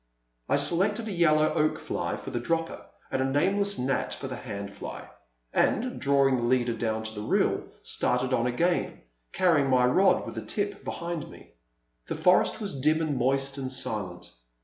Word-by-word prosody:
I - - +4
selected 190 +10 +2
a - - -3
yellow 155 -4 +3
Oak 155 0 +1
fly - - -3
for - - -8
the 120 - -2
dropper 165 +6 -2 0.2
and 130 - 0
a - - +2
nameless 195 +9 +1
Gnat 130 +2 -1
for 135 - -6
the 130 - -5
hand 100 -5 -6
fly, - - -8 0.5
and, 250 +3 +1
drawing 140 -1 +3
the - - -2
leader 120 0 +2
down 110 -1 -2
to 110 0 -5
the 105 - -6
reel, 105 - +1 0.2
started 125 +1 0
on 120 -1 +2
again, 170 +8 0 0.3
carrying 160 -7 +3
my 125 -1 +4
rod 185 +8 +3
with - - -6
the - - -5
tip 205 -1 -3
behind 170 -2 -4
me. - - -15 0.6
The - - -3
forest 180 +4 +3
was 195 - -5
dim 155 +3 +3
and 155 -3 -1
moist 135 +2 0
and 130 -1 -4
silent. 105 -9 -4
135 Hz, 180 wpm, -27 LUFS, 125-170 Hz, 0.6 s, I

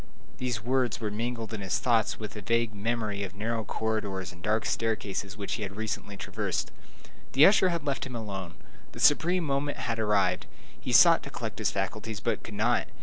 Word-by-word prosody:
These 120 -4 -2
words 125 -1 +1
were 110 -3 -2
mingled 115 +1 -3
in 105 - -4
his 95 -2 0
thoughts 115 -3 +2
with 105 -1 -6
a 105 - -5
vague 115 +2 +1
memory 105 -1 -2
of 100 0 -5
narrow 110 +2 -2
corridors 100 -4 -2
and 90 0 -15
dark 110 +3 +1
staircases 105 -3 -2
which 100 -1 -3
he 115 - -3
had 100 -1 -4
recently 105 -2 -4
traversed. - - -2 0.6
The 140 +4 +8
usher 190 -2 +6
had 170 -3 -2
left 140 -1 -1
him 125 - -7
alone. 95 -6 -5 0.4
The - - -9
supreme 175 +4 +4
moment 145 -1 -1
had 115 -1 -2
arrived. 100 -4 +2 0.3
He - - -4
sought - - +8
to - - -8
collect - - -5
his - - +2
faculties, 105 +2 -3
but - - -1
could 110 - -8
not. 115 +3 +2
110 Hz, 195 wpm, -29 LUFS, 100-120 Hz, 0.6 s, The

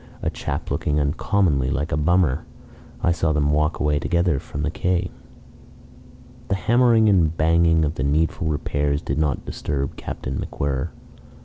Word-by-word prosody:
A - - 0
chap - - -4
looking 75 0 0
uncommonly 70 -1 +1
like 70 +4 -2
a - - +1
bummer. 80 -1 +2 0.6
I 85 - +3
saw 80 -2 +1
them 75 -1 +1
walk 75 +2 +1
away 75 -1 +1
together 85 -4 +1
from 70 +2 -6
the 75 - -1
quay." 90 +1 -1 1.4
The 95 - +1
hammering 115 +1 +4
and 85 -5 +3
banging 80 0 +3
of 75 - -1
the 65 - -3
needful 80 +4 0
repairs 70 0 -1
did 70 +3 -2
not 75 -4 0
disturb 70 -1 -3
Captain 65 0 -5
MacWhirr. 70 +2 -2
75 Hz, 150 wpm, -22 LUFS, 70-85 Hz, 1.4 s, hammering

